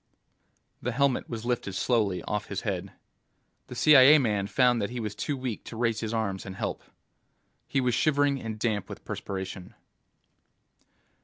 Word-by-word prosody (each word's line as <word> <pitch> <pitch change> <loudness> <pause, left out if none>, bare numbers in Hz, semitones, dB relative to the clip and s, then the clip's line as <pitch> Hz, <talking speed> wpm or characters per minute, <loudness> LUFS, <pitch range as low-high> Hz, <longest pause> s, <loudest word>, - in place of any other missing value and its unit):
The 125 - -2
helmet 140 +1 +1
was 115 -1 -5
lifted 120 -5 -2
slowly 105 -7 +1
off 105 - -3
his - - -4
head. - - -3 0.8
The - - -8
CIA 150 0 +8
man 105 -7 0
found 125 0 +3
that 100 - -1
he 125 0 -5
was 105 -3 -3
too 145 +4 -3
weak 125 -4 -4
to 115 - -8
raise 115 -2 0
his 110 -1 -3
arms 100 -4 -2
and 95 -1 -8
help. 105 +1 -3 0.9
He 140 - 0
was 125 -1 +1
shivering 145 -2 +2
and 110 -1 -5
damp 105 -3 -1
with - - -9
perspiration. 95 -1 -6
115 Hz, 160 wpm, -28 LUFS, 105-130 Hz, 0.9 s, CIA